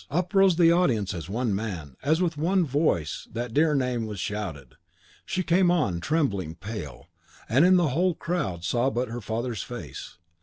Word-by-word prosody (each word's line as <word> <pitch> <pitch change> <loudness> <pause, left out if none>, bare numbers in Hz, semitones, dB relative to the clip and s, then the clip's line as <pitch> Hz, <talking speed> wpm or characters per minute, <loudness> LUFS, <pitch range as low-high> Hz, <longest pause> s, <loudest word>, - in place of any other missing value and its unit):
Up 175 +4 -1
rose 195 -2 +5
the 165 -1 +5
audience 120 - +2
as 85 -1 -6
one 115 +1 -1
man, 90 - -4
as 160 +5 +2
with 165 -3 0
one 175 +4 +2
voice 130 - 0
that 120 0 -4
dear 150 +2 +3
name 125 -4 0
was 105 -3 -6
shouted. 85 - -5 0.5
She 185 - -1
came 175 +2 +3
on, 130 - +1
trembling, 100 - -1
pale, 100 -3 -7 0.4
and 130 +7 +4
in 185 - +6
the 175 -4 +3
whole 175 +6 +1
crowd 95 - -3
saw 120 +9 +1
but 125 -1 -2
her 120 +1 -5
father's 115 0 -3
face. - - -8
125 Hz, 180 wpm, -26 LUFS, 100-165 Hz, 0.5 s, in